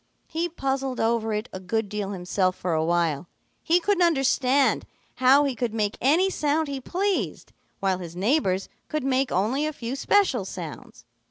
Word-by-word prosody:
He 335 +2 -2
puzzled 270 -4 -2
over 225 -1 +1
it 210 +2 -2
a 190 - -5
good 215 +4 -1
deal 205 -1 -3
himself 185 -1 0
for 180 -2 -2
a 160 0 +1
while. 170 -1 0 0.3
He 340 +2 +3
couldn't 390 +1 +1
understand 270 -4 +3 0.3
how 260 +3 +6
he 280 -2 0
could 240 -2 -3
make 210 -1 0
any 315 +9 +4
sound 310 -3 0
he 275 -1 -4
pleased, 385 +7 -2 0.3
while 190 -2 +1
his 170 -2 -8
neighbors 195 - +1 0.2
could 305 -2 -2
make 265 0 +1
only 220 +10 +1
a - - -2
few 245 -2 -5
special 275 - +2
sounds. 175 -5 -8
250 Hz, 170 wpm, -25 LUFS, 190-290 Hz, 0.3 s, how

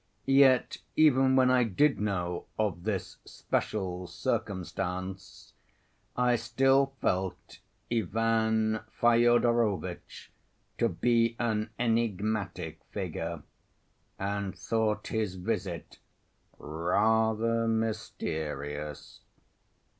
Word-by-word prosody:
Yet 135 -2 +4 0.2
even 135 -4 +5
when 130 -1 +5
I 125 -1 +4
did 135 +7 +2
know 90 -4 -2
of 100 -5 -1
this 100 -4 -3
special 90 -3 -3
circumstance 95 0 -4 0.6
I 125 -1 +3
still 135 +3 +2
felt 95 0 -2 0.3
Ivan 110 0 +1
Fyodorovitch 120 -5 +1 0.5
to 115 - +3
be 115 +4 +2
an 110 -2 -1
enigmatic 105 -7 -1
figure, 85 -5 -4 0.7
and 100 0 -3
thought 110 -1 -1
his 110 -4 -1
visit 90 -3 -4 0.6
rather 110 +8 +1
mysterious. 75 -10 -3
110 Hz, 80 wpm, -29 LUFS, 90-115 Hz, 0.7 s, even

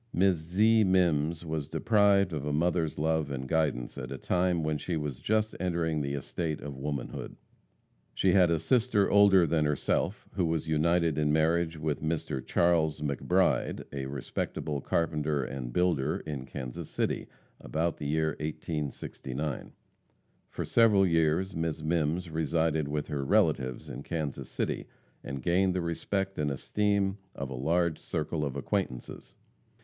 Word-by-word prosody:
Miss 95 0 +3
Zee 105 +8 +3
Mimms 85 -4 +2
was 80 -3 -3
deprived 100 +2 +3
of 75 -3 -3
a 75 - -2
mother's 80 +1 +1
love 80 -1 +1
and 65 -1 -4
guidance 70 -5 0
at 65 -1 -6
a 70 - -4
time 90 +2 +1
when 75 -1 -1
she 85 +3 -2
was 75 -5 -4
just 110 0 0
entering 85 -4 0
the 70 0 -2
estate 75 +3 -3
of 70 -1 -7
womanhood. 70 -1 -5 0.8
She 95 - +3
had 90 -2 +5
a 85 - +3
sister 110 +3 +2
older 100 -3 +6
than 80 -1 +1
herself 75 +6 -1
who 95 -3 +1
was 80 -1 -1
united 80 0 +2
in 75 -1 +2
marriage 80 +1 +2
with 75 -1 -2
Mr. 80 -4 -2
Charles 85 -3 +2
McBride, 70 -2 +1
a 70 -1 -3
respectable 70 +1 -3
carpenter 75 -3 0
and 65 -2 -5
builder 80 -2 +1
in 70 -4 -5
Kansas 65 -4 -6
City, - - -1 0.3
about 80 +1 -1
the 75 - -4
year 80 +1 +1
1869. 75 -2 -4 0.8
For - - -4
several 105 -4 +5
years 85 +2 +2
Miss 80 -1 -2
Mimms 80 +1 0
resided 80 -1 +1
with 75 0 -2
her 70 -2 -2
relatives 65 -1 +1
in - - -7
Kansas 75 -2 -4
City, - - -2 0.4
and 70 -2 -6
gained 90 +1 +2
the 90 - 0
respect 95 +3 -2
and 75 -1 +1
esteem 100 +7 0 0.2
of 70 -1 -5
a - - -3
large 80 +5 +1
circle 80 -1 -2
of 70 -3 -3
acquaintances. 70 -3 -3
80 Hz, 150 wpm, -29 LUFS, 75-90 Hz, 0.8 s, older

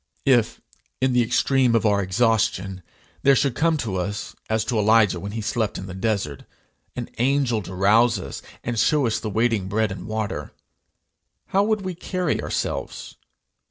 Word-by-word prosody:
If, 120 -5 +3 0.4
in 130 -1 +2
the 125 - +4
extreme 125 +1 +2
of 115 - +2
our 100 -1 +3
exhaustion, 95 -2 0 0.4
there 140 0 +5
should 135 -1 +1
come 160 +5 +2
to 110 -9 -3
us, 100 +3 -4
as 110 0 0
to 115 -1 0
Elijah 105 -3 +4
when 100 +3 -6
he 115 - -3
slept 110 0 -1
in 95 - -6
the 95 - -7
desert, 95 - -2 0.5
an - - -4
angel 130 -3 +2
to 95 0 -8
rouse 110 +5 +4
us, - - -7 0.2
and 120 -2 -2
show 145 +3 +3
us 115 - 0
the 110 - -4
waiting 110 -2 +1
bread 105 +1 0
and 95 - -7
water, 110 -9 -4 1.0
how 195 - +3
would 215 -1 +1
we 185 -1 -4
carry 180 -1 -2
ourselves? - - -4
110 Hz, 170 wpm, -23 LUFS, 100-125 Hz, 1.0 s, there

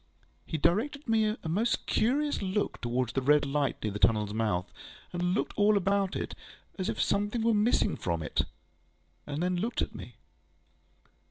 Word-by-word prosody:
He 160 - -2
directed 220 - +1 0.4
a - - -4
most 210 +9 0
curious 290 +6 +1
look 195 +1 -1
towards 125 0 -1
the 135 - 0
red 145 +2 +4
light 140 0 -1
near 105 - -1
the 105 - -4
tunnelŌĆÖs 105 -2 +2
mouth, 105 -5 -1 0.4
and 180 +1 0
looked - - -1
all 205 0 +4
about 195 0 +1
it, - - -3 0.5
as 185 - -1
if - - -3
something 205 +3 +1
were 230 0 +3
missing 215 +3 +2
from 85 -2 -2
it, - - 0 0.8
and 150 +3 -2
then 180 0 +1
looked 225 +7 -2
at - - -1
me. - - -9
180 Hz, 165 wpm, -30 LUFS, 130-210 Hz, 0.8 s, red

